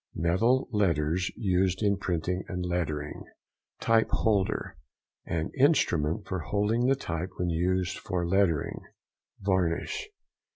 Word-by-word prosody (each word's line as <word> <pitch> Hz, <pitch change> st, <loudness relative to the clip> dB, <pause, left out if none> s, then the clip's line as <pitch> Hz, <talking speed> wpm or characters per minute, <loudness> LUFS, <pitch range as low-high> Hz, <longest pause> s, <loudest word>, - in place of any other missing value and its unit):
—Metal 115 Hz, +11 st, +2 dB
letters 85 Hz, -, +1 dB
used 95 Hz, -1 st, +1 dB
in 100 Hz, -1 st, +3 dB
printing 90 Hz, -1 st, -2 dB
and 90 Hz, -2 st, -3 dB
lettering. 80 Hz, -4 st, -2 dB, 0.6 s
TYPE 115 Hz, -1 st, +3 dB
HOLDER.—An 85 Hz, -, -2 dB
instrument 100 Hz, -, +3 dB
for 95 Hz, -, -2 dB
holding 105 Hz, -, +1 dB
the 135 Hz, -, +4 dB
type 85 Hz, -7 st, -4 dB
when 90 Hz, -1 st, 0 dB
used 90 Hz, +2 st, 0 dB
for 90 Hz, -1 st, -2 dB
lettering. 90 Hz, -5 st, +1 dB, 0.6 s
VARNISH. 95 Hz, -, 0 dB
90 Hz, 110 wpm, -28 LUFS, 85-100 Hz, 0.6 s, the